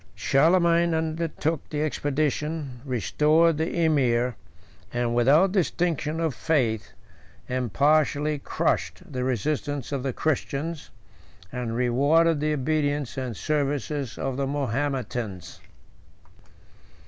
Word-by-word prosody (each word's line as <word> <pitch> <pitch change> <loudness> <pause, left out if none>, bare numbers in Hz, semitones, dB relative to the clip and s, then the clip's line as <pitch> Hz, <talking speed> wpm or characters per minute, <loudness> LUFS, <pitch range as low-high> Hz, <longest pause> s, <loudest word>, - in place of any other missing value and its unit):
Charlemagne 170 +3 +3
undertook 160 -1 -2
the 150 0 -1
expedition, 150 -2 -2
restored 150 - +2
the 165 +1 0
emir, 125 -5 +2 0.6
and, 120 -1 -1
without 145 +10 +4
distinction 165 -4 0
of 165 -4 0
faith, 120 -9 0 0.5
impartially 145 +4 +1
crushed - - -1
the 125 -1 -2
resistance 140 +3 -2
of 140 -2 -1
the 135 0 -1
Christians, 155 +3 -2 0.6
and 120 -2 -3
rewarded 145 +7 +3
the 155 +1 0
obedience 145 -1 -1
and 125 -5 -4
services 145 -3 -2
of 135 -1 -3
the 140 -1 -1
Mahometans. 130 - -3
145 Hz, 100 wpm, -25 LUFS, 125-155 Hz, 0.6 s, without